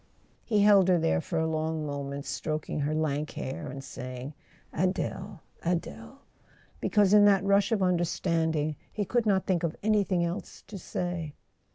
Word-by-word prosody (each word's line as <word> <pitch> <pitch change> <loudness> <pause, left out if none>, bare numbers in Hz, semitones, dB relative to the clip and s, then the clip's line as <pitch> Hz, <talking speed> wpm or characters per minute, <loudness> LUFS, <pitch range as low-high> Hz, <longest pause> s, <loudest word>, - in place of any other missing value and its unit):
He 215 -3 +2
held 200 -3 +6
her 180 -1 +5
there 80 - +1
for 170 - -4
a 160 - +1
long 160 0 -1
moment, 140 0 -4
stroking 155 -1 -3
her 150 +2 0
lank 155 -1 -1
hair, 130 - -5
and 135 +1 -7
saying 130 +2 -7 0.4
"Adele—Adele," 180 - -3 0.6
because 205 -2 +3
in 205 -1 +8
that 200 -2 +5
rush 200 +2 +3
of 210 -4 +2
understanding 165 -3 0
he 205 - -2
could 235 +2 0
not 190 -2 +2
think 180 -3 +1
of 170 -2 -2
anything 200 -5 +2
else 170 +4 -6
to 200 - -8
say. 175 -4 -4
170 Hz, 155 wpm, -28 LUFS, 150-195 Hz, 0.6 s, in